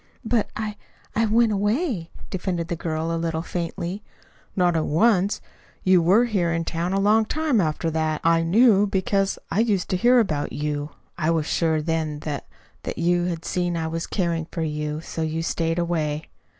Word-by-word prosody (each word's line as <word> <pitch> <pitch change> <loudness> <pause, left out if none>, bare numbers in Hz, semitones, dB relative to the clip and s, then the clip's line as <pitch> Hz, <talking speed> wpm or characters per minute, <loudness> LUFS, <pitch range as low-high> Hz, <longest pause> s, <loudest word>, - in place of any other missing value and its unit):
"But 225 -1 +1
I 210 -1 -4 0.4
I 225 +1 +2
went 225 +1 +3
away," 205 - 0 0.2
defended 175 -3 -2
the 170 - -1
girl, 160 0 -2
a 165 - -2
little 165 -1 -2
faintly. 175 +3 -4 0.5
"Not 180 -2 +3
at 160 - 0
once. 195 +4 +2 0.4
You 185 -1 +5
were 195 +8 +5
here 190 -7 0
in 165 0 -1
town 170 +2 -2
a 195 - +1
long 210 +3 +4
time 295 -1 +1
after 160 0 -1
that. 155 -1 0
I 165 0 +4
knew 205 +4 +5
because 195 0 0
I - - +1
used 210 -5 +1
to 185 - +2
hear 245 +6 +5
about 155 -10 -1
you. 150 0 -2 0.3
I 155 -1 +1
was 165 -2 +1
sure 160 -1 +1
then 160 -2 -1
that 150 -2 -4 0.3
that - - -5
you 175 +1 +2
had 170 -2 -3
seen 175 -1 -1
I 165 - -2
was 165 +1 -3
caring 170 -4 -1
for 165 - -2
you, 150 -1 -2
and 155 - -6
so 165 - -5
you 160 +1 -1
stayed 165 0 -1
away. 160 -3 -1
170 Hz, 190 wpm, -24 LUFS, 160-200 Hz, 0.5 s, You